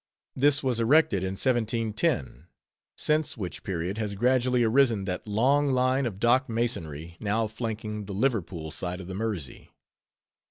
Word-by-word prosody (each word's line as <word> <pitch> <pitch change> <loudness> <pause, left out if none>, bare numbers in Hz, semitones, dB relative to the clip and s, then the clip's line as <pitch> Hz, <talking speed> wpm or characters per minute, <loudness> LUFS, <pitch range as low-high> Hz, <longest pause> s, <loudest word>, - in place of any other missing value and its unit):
This 145 +2 +3
was 125 -3 0
erected 115 - +4
in 95 0 -2
1710, 110 - 0 0.5
since 155 -2 0
which 95 -5 -5
period 95 +3 -3
has 105 -2 -2
gradually 125 +2 +2
arisen 115 -3 +3
that 90 +2 -4
long 135 +7 +2
line 130 0 +2
of 100 -4 -6
dock 125 +3 +3
masonry, 85 - -3
now 110 +2 0
flanking 110 -1 -4
the 100 - -6
Liverpool 95 - -1
side 90 +3 -4
of 95 - -8
the 95 - -7
Mersey. 100 -8 -4
110 Hz, 145 wpm, -27 LUFS, 95-125 Hz, 0.5 s, erected